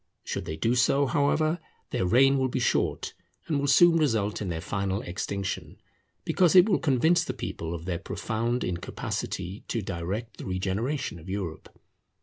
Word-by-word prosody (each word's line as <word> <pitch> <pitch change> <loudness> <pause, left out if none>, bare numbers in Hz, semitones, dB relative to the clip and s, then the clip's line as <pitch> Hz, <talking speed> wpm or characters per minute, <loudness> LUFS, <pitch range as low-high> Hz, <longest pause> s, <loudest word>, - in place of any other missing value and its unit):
Should - - -4
they 80 - -4
do 115 - +1
so, 135 +3 +3
however, 155 +5 +1 0.3
their 90 - 0
reign 135 +6 +5
will 130 - +2
be 130 - -3
short, 120 - 0 0.3
and 150 -3 0
will 140 - 0
soon 170 +4 +6
result 110 -10 +1
in 100 - -2
their 80 -2 -2
final 100 +3 -2
extinction; 95 +2 -4 0.5
because 180 -1 +3
it 180 +2 +8
will 200 - +3
convince 160 +5 +3
the - - -4
people 85 +1 -4
of 85 0 -8
their 90 -2 -2
profound 115 +5 -2
incapacity 90 +2 -4
to 115 -3 -2
direct 95 +6 -4
the - - -8
regeneration 95 - -2
of 85 +4 -12
Europe. 95 -5 -5
110 Hz, 165 wpm, -27 LUFS, 95-140 Hz, 0.5 s, it